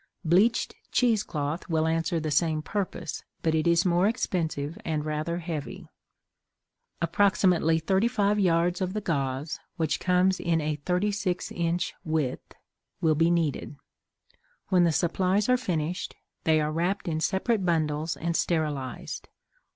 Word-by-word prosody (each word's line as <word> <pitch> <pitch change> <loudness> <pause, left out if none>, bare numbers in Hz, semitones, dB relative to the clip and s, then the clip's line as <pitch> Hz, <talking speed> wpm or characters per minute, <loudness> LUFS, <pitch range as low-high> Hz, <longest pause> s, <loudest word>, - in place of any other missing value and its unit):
Bleached 200 +9 +3 0.2
cheese 230 -4 +3
cloth 150 0 -4
will 160 -1 +2
answer 165 +1 0
the 155 -1 -3
same 155 0 +1
purpose, 180 -6 -4 0.2
but 160 - +2
it 160 +1 +1
is 170 +1 +4
more 180 +2 +3
expensive 165 - -1
and 155 -2 -2
rather 155 +2 -2
heavy. 165 -4 -5 1.2
Approximately 175 -2 +3
thirty 190 +7 +2
five 210 -3 +1
yards 175 -1 +2
of 185 0 -1
the 215 - -2
gauze, 140 -3 -2 0.2
which 160 -3 0
comes 185 +1 +2
in 165 -1 +1
a 150 -1 -1
thirty 180 +7 0
six 195 -3 -2
inch 170 0 -1
width, 155 -6 -2 0.5
will 160 -1 +3
be 165 +2 +3
needed. 165 -4 0 0.9
When 180 -2 +4
the 170 - +3
supplies 185 +5 +1
are 250 - +5
finished, 180 -8 -2 0.3
they 160 -1 +4
are 150 0 0
wrapped 180 +5 -1
in 160 -2 -1
separate 195 +5 0
bundles 160 -2 0
and 170 +1 -2
sterilized. 150 -8 -2
170 Hz, 145 wpm, -27 LUFS, 155-185 Hz, 1.2 s, are